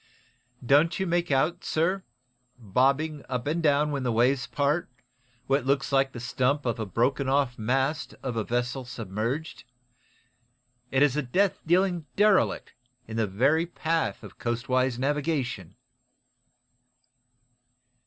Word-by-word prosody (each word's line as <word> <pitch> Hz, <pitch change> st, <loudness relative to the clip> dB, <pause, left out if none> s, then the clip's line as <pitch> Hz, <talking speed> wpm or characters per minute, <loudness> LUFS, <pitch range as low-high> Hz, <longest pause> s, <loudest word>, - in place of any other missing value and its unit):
"Don't 150 Hz, +8 st, +4 dB
you 190 Hz, -, 0 dB
make 175 Hz, 0 st, 0 dB
out, 145 Hz, +5 st, +1 dB
sir, 180 Hz, +5 st, 0 dB, 0.6 s
bobbing 135 Hz, +7 st, +1 dB
up 125 Hz, -2 st, -2 dB
and 160 Hz, +4 st, -1 dB
down 150 Hz, -1 st, +2 dB
when 140 Hz, -2 st, -2 dB
the 125 Hz, -2 st, 0 dB
waves 125 Hz, +4 st, +2 dB
part, 145 Hz, +3 st, 0 dB, 0.6 s
what 135 Hz, 0 st, +1 dB
looks 135 Hz, +1 st, 0 dB
like 135 Hz, -1 st, +2 dB
the 120 Hz, -, -8 dB
stump 130 Hz, +4 st, 0 dB
of 120 Hz, -1 st, 0 dB
the 110 Hz, -2 st, -4 dB
broken 130 Hz, +7 st, 0 dB
off 135 Hz, -3 st, +1 dB
mast 135 Hz, +7 st, -1 dB
of 125 Hz, -3 st, -3 dB
a 110 Hz, -, 0 dB
vessel 125 Hz, +3 st, -2 dB
submerged? 115 Hz, +6 st, -4 dB, 1.3 s
Is 135 Hz, +1 st, +3 dB
it -, -, +1 dB
a 135 Hz, -, -4 dB
death 195 Hz, +8 st, +1 dB
dealing 175 Hz, -2 st, +2 dB
derelict 205 Hz, -1 st, +2 dB, 0.3 s
in 110 Hz, 0 st, -6 dB
the 110 Hz, -2 st, +1 dB
very 135 Hz, -, +2 dB
path 165 Hz, -1 st, -2 dB
of -, -, -12 dB
coastwise 125 Hz, +1 st, 0 dB
navigation!" 135 Hz, -, -2 dB
135 Hz, 135 wpm, -27 LUFS, 125-155 Hz, 1.3 s, Don't